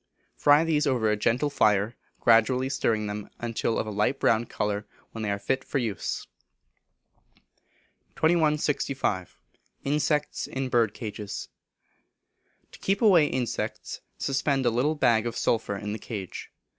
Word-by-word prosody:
Fry 145 +2 +5
these 155 -2 +1
over 120 -5 +2
a - - +2
gentle 125 +7 +1
fire, 105 -2 +2 0.2
gradually 125 +3 +4
stirring 115 -5 0
them 105 0 -5
until 115 -1 -1
of - - -1
a 110 - -5
light 105 +6 0
brown 115 +1 +2
colour, 105 0 -2 0.2
when 115 - -7
they 105 - -2
are 100 - 0
fit 130 +6 -1
for - - -2
use. 115 -7 -2 1.9
2165. 150 - +1 0.5
Insects 150 +1 0
in 130 -1 -3
Birdcages. 110 -3 -2 1.2
To - - -14
keep 200 +3 0
away 175 -8 +6
insects 125 -3 -3 0.2
suspend 135 0 0
a 120 - +4
little 135 +7 +1
bag 120 -5 +3
of 120 - -4
sulphur 110 -3 0
in 105 +1 -4
the 110 - -5
cage. 100 -4 -6
120 Hz, 135 wpm, -27 LUFS, 105-145 Hz, 1.9 s, away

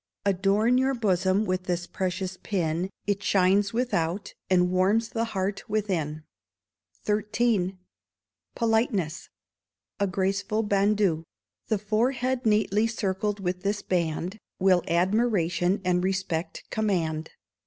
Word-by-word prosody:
Adorn 200 +5 +3
your 265 +1 +1
bosom 190 -2 +1
with 185 -1 -1
this 175 -1 -1
precious 185 0 -3
pin, 175 -2 -1 0.2
It 200 0 0
shines 200 +1 +3
without, 200 -6 -1 0.2
and 180 -1 +3
warms 200 +5 +2
the 230 0 -1
heart 195 -2 -2
within. 170 -8 -1 0.8
xiii 210 -2 +1 0.8
Politeness 220 -8 0 0.7
A 200 - +2
Graceful 195 +3 0
Bandeau. 200 -5 +2 0.4
The 220 - +1
forehead 245 +4 0
neatly 210 0 +3
circled 205 -1 -2
with 180 -1 -2
this 205 +2 -1
band, 175 +3 -1 0.2
Will 185 -2 +4
admiration 185 0 +2
and 180 0 +2
respect 185 -3 -2
command. 165 -7 -1
195 Hz, 110 wpm, -27 LUFS, 180-215 Hz, 0.8 s, Will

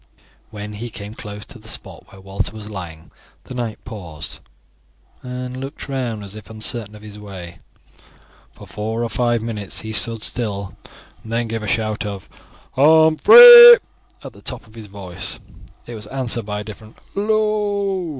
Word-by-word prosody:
When 105 0 -8
he 115 +4 -6
came 105 -1 -9
close 105 -2 -9
to 120 - -10
the 110 - -14
spot 95 -2 -8
where 95 - -15
Walter 95 +2 -4
was 105 0 -9
lying 85 -5 -9 0.3
the - - -10
knight 120 -3 -5
paused 90 -10 -8 0.8
and 125 0 -6
looked 135 +3 -8
round 125 -6 -4
as 100 +1 -10
if 105 -1 -12
uncertain 110 -1 -4
of 105 - -14
his 105 -1 -11
way. 95 -4 -10 1.0
For - - -13
four 110 +2 -4
or 115 - -3
five 120 0 0
minutes 105 -4 -5
he 110 0 -7
stood 115 0 -1
still, 100 -5 -4 0.5
and 110 - -11
then 115 0 -1
gave 115 0 -4
a 110 - -6
shout 110 0 -1
of 100 -3 -7 0.5
"Humphrey" 470 - +9 0.5
at - - -9
the - - -17
top - - -4
of 110 - -20
his 110 -2 -11
voice. 95 -3 -6 0.5
It 120 - -9
was 105 -2 -9
answered 120 -3 -3
by 105 0 -4
a - - -7
distant 110 +1 -12 0.2
"Hallo!" 205 -3 -1
110 Hz, 170 wpm, -20 LUFS, 105-125 Hz, 1.0 s, Humphrey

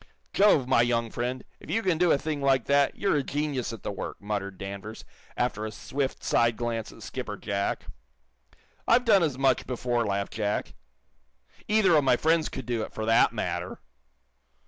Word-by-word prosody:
"Jove, 195 -11 +4
my 130 - +4
young 115 -1 0
friend, 125 +1 -3 0.2
if - - -14
you 225 +2 0
can 180 -4 +1
do 175 -2 +4
a - - +4
thing 150 0 -3
like 135 -3 +2
that, 140 0 +3
you're 195 -6 +1
a - - +2
genius 140 -3 -2
at 115 - -9
the - - -3
work," 100 - -6
muttered 100 -2 -4
Danvers, 100 +3 -7 0.3
after 120 -3 -1
a 110 - -4
swift, 130 +6 -4
side 115 -1 +2
glance 115 -2 -3
at 115 - -13
Skipper 110 -5 -5
Jack. 100 -1 -2 1.0
"I've 245 +2 +4
done 205 -4 +5
as 150 -6 0
much 135 -2 +2
before," 120 -1 -1
laughed 100 -2 -2
Jack. 105 -1 -2 0.9
"Either 210 -5 +4
of 150 - +4
my 130 -2 +4
friends 160 +2 +2
could - - -7
do 120 -2 -1
it, - - -5
for 110 - -4
that 115 +1 +4
matter." - - -4
125 Hz, 185 wpm, -27 LUFS, 110-145 Hz, 1.0 s, done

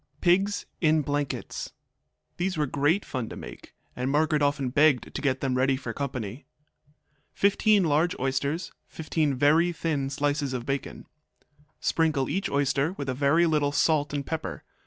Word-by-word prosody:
Pigs 195 +4 +2
in 155 -2 +3
Blankets 145 0 -3 0.6
These 185 0 -1
were 150 - +2
great 145 +8 +1
fun 125 -4 -4
to - - -8
make, - - -11 0.2
and 125 +1 -2
Margaret 150 +1 +2
often 145 -2 +1
begged 145 0 +3
to - - -4
get 130 -2 0
them 135 -2 0
ready 130 +1 +2
for 125 -3 -5
company. 125 -3 -5 0.9
15 205 0 +3
large 160 +2 +1
oysters. 140 +6 -1 0.2
15 155 -3 -1
very 155 +6 +4
thin 155 -5 -2
slices 145 0 -1
of 120 -2 -4
bacon. 135 0 -4 0.7
Sprinkle 155 -5 +1
each 195 +1 -1
oyster 140 +3 +1
with 140 -7 -5
a - - 0
very 140 +6 +3
little 150 -3 +1
salt 150 0 +2
and 145 -1 -3
pepper. 160 -1 -4
145 Hz, 155 wpm, -27 LUFS, 135-160 Hz, 0.9 s, very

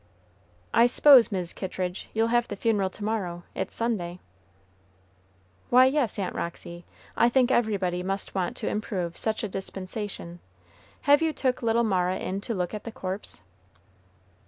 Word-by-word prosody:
"I 235 +1 +6
s'pose, 255 -1 +7
Mis' 180 -3 -3
Kittridge, 185 -1 -4
you'll 225 +1 +1
have 240 0 +3
the 205 - -5
funeral 205 -2 +1
to 205 - -10
morrow, 190 -5 -2
it's - - -4
Sunday." 185 -7 -2 1.5
"Why, 255 +1 +7
yes, 265 -5 +1
Aunt 190 -3 -2
Roxy, 170 0 -6 0.3
I 235 - +4
think 255 0 +3
everybody 195 -7 +1
must 195 +2 -3
want 185 -2 -2
to - - -3
improve 185 -5 -2
such 220 0 -1
a - - 0
dispensation. 190 -2 -6 0.6
Have 285 +2 +5
you 320 -1 +2
took 255 -3 -1
little 230 0 +2
Mara 185 -4 +1
in 190 +2 -3
to 230 +1 -3
look 180 0 -2
at 210 - -5
the 230 - -6
corpse?" 190 - -6
205 Hz, 155 wpm, -27 LUFS, 185-230 Hz, 1.5 s, s'pose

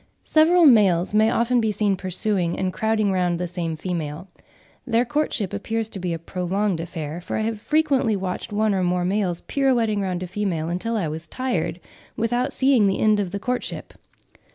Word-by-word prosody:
Several 330 +2 +5
males 200 - +5
may 215 +1 +4
often 235 +1 +2
be 220 -1 +1
seen 205 -1 +1
pursuing 185 -1 -1
and 185 -1 -1
crowding 220 -2 +1
round 180 -2 +1
the 180 - -1
same 170 -2 -3
female. 160 0 -4 0.6
Their 235 +1 +2
courtship 260 -8 -1
appears 225 -1 -2
to 195 - -5
be 180 -1 -2
a 165 - -2
prolonged 180 +2 -2
affair, 165 -1 -5
for - - -4
I - - -1
have 220 -1 -2
frequently 275 -6 +2
watched 185 0 -4
one 210 0 +1
or 190 - 0
more 180 0 0
males 185 -3 -1
pirouetting 240 -7 +1
round 185 -2 -2
a - - -5
female 175 -5 -2
until 225 +7 -2
I 185 -6 -1
was 160 +2 -6
tired, 255 +6 -2 0.4
without 240 +2 0
seeing 260 -6 +3
the 195 - +1
end 215 -1 +3
of 195 -3 -1
the 200 - -4
courtship. 250 +5 -4
200 Hz, 185 wpm, -23 LUFS, 180-230 Hz, 0.6 s, Several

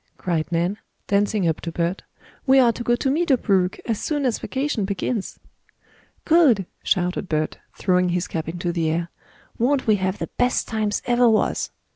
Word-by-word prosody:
cried 170 -3 -2
Nan, 175 +5 0 0.3
dancing 200 -2 +1
up 160 - -1
to 170 - -4
Bert. 170 +3 -1 0.5
"We 265 +1 +6
are 245 -3 +6
to 235 - -8
go 240 0 +2
to 265 +2 0
Meadow 305 -2 +2
Brook 190 -4 +1
as 225 -3 -2
soon 295 -3 -1
as 245 -4 0
vacation 265 -5 -2
begins!" 200 +2 -3 0.9
"Good!" 295 - +4 0.2
shouted 180 0 0
Bert, 155 -1 -1 0.2
throwing 180 -1 +2
his 175 0 -1
cap 160 -1 -4
into 175 +1 -3
the 165 -2 0
air. 170 +2 -2 0.5
"Won't 260 +3 +2
we 215 -2 +4
have 185 0 -1
the - - -5
best 250 0 +1
times 215 -2 -1
ever 240 0 +4
was!" 220 - +1
200 Hz, 175 wpm, -23 LUFS, 175-245 Hz, 0.9 s, We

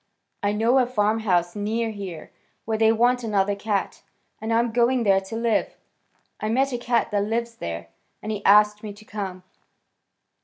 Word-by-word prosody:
I 205 - +1
know 230 +5 +3
a 250 - +2
farmhouse 210 -6 +1
near 220 +2 -1
here 195 -6 -8 0.3
where 220 - -1
they 220 0 +5
want 245 +2 +2
another 205 -2 +1
cat, 200 0 -2 0.4
and 220 +1 -3
I'm 230 +1 +2
going 240 +1 +2
there 195 -2 +4
to 195 +3 -8
live. 230 -1 0 0.6
I 215 - -2
met 265 +4 +1
a 245 - -2
cat 240 -1 0
that 205 -1 +1
lives 230 +2 -2
there, 85 0 -6 0.3
and 215 - -5
he 205 -2 -4
asked 210 +1 +5
me 210 -2 -7
to 210 +1 -16
come." 195 -4 -6
215 Hz, 175 wpm, -24 LUFS, 200-230 Hz, 0.6 s, they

